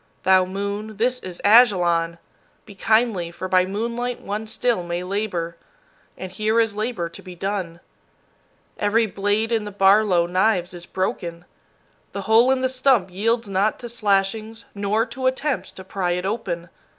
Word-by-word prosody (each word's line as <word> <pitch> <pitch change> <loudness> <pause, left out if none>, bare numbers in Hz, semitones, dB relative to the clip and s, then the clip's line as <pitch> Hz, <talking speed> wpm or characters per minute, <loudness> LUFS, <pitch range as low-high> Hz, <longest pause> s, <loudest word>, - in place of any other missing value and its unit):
Thou 185 0 +5
moon, 200 +3 -4
this 250 +3 +1
is 185 -6 -8
Ajalon! 175 -7 +4 0.5
Be 205 - -12
kindly, 220 -3 +1
for 175 +2 -6
by 185 -1 +3
moonlight 235 +4 -3
one 210 +2 -5
still 230 -2 0
may 175 0 -4
labor, 180 -4 -3 0.6
and 185 -1 -7
here 215 +4 +1
is 225 -3 +1
labor 215 -5 -2
to 170 - -11
be 180 -1 -10
done. 185 -2 -3 1.0
Every 220 +3 +2
blade 205 +2 -1
in 225 -2 +1
the 210 - -5
Barlow 195 -2 +4
knives 185 0 +1
is 175 -1 -9
broken. 175 -2 -3 0.7
The 200 - -4
hole 225 +4 +5
in 265 -1 +2
the 260 - +2
stump 255 -7 +2
yields 230 +4 0
not 200 +2 +1
to 240 - -8
slashings, 215 0 -1
nor 205 +2 0
to 260 +2 -3
attempts 275 +2 -1
to 190 - -10
pry 185 -2 -2
it 180 +1 -3
open. 185 -5 -3
205 Hz, 160 wpm, -22 LUFS, 185-225 Hz, 1.0 s, Thou